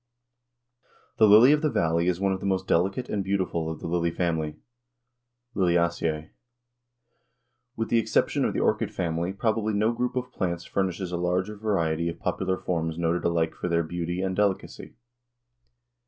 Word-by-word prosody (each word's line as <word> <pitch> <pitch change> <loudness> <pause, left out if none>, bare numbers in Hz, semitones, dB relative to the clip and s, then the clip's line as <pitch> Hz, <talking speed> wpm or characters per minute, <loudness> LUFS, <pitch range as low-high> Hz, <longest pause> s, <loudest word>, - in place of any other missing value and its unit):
_ - - -48
The 110 - +7
lily 110 +6 +8
of 150 0 +3
the 155 - +2
valley 85 - +1
is 90 -1 +1
one 95 0 +1
of 95 - -3
the 100 - -3
most 95 -1 0
delicate 95 +9 +1
and 100 -2 -2
beautiful 95 -4 -1
of 80 - -6
the - - -4
lily 85 0 0
family 80 -3 -1 1.0
(Liliaceæ). 85 -4 0 1.4
With 115 0 -3
the 115 - +4
exception 115 - +1
of - - 0
the - - +1
orchid - - +1
family 85 +1 -2
probably 110 +1 -1
no 110 +3 +2
group 125 +2 -2
of 125 0 -3
plants 85 -6 -3
furnishes 95 -1 -2
a 90 - -2
larger 90 +4 -1
variety 85 -6 0
of 85 - -6
popular 95 0 -1
forms 80 -3 -2
noted 85 0 0
alike 85 -1 +1
for - - -4
their 85 0 +2
beauty 85 +2 -3
and 95 -1 -1
delicacy. 100 -2 -2
90 Hz, 170 wpm, -26 LUFS, 85-100 Hz, 1.4 s, lily